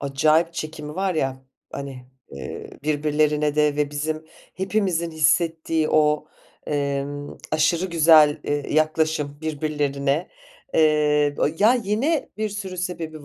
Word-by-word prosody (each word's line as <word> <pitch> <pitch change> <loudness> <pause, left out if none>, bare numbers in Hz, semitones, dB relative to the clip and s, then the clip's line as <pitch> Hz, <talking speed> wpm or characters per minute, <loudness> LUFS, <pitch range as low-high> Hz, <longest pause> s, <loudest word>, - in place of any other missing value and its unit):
acayip 155 +4 +2
çekimi 155 -2 -6
var 190 0 -1
ya, 130 -3 -2 0.3
hani, 135 -3 -7 0.2
eee, 70 - -8
birbirlerine 150 0 +1
de 150 -1 +2
ve 150 -1 0
bizim 155 +2 -3 0.3
hepimizin 185 -3 -1
hissettiği 160 0 +1
o, 150 0 +2 0.4
emm, 145 0 -3 0.2
aşırı 165 +4 +2
güzel, 160 -3 +5
eee, 145 0 -2
yaklaşım 155 -2 +1
birbirlerine, 150 -1 -1 0.5
eee, 150 -2 +3
o - - +3
ya, 220 +5 +5
yine 245 +8 0
bir 215 0 -1
sürü 195 -2 -6
sebebi 165 -4 -5
155 Hz, 120 wpm, -23 LUFS, 145-165 Hz, 0.5 s, güzel